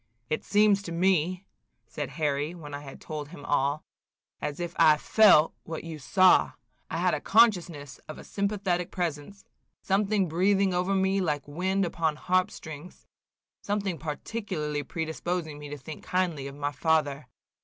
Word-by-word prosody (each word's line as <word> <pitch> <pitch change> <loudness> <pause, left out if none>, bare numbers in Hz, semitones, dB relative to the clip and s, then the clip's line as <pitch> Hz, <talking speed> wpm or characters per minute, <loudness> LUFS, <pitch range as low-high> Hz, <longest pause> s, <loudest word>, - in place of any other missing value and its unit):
"It 155 - -1
seems 205 -1 +3
to 180 - -7
me," 180 +1 +1 0.4
said - - -5
Harry, 150 +1 -1
when 150 -4 -10
I 145 - -4
had 140 -2 -10
told 150 -2 -6
him 145 -4 -11
all, 145 +1 0 0.6
"as 145 +2 -4
if 175 -1 -4
I 155 -2 +6
felt 185 -3 +5
what 160 -1 -6
you 165 -2 -7
saw. 185 +6 +4 0.4
I - - -3
had - - +2
a - - -1
consciousness 175 - +2
of 155 - -8
a - - -10
sympathetic 200 -4 -1
presence, 175 +2 -4 0.4
something 200 0 +1
breathing 190 +3 +2
over 180 +2 +1
me 190 +1 +2
like 150 -6 -1
wind 190 +6 0
upon 165 -2 -1
harp 185 +4 +1
strings, 155 +3 -10 0.6
something 200 -4 -2
particularly 155 -2 -4
predisposing 160 +1 -4
me 145 0 -8
to 145 - -6
think 145 +3 -9
kindly 170 -7 -1
of 140 - -9
my 145 0 -2
father. 150 -2 0
165 Hz, 155 wpm, -28 LUFS, 150-190 Hz, 0.6 s, I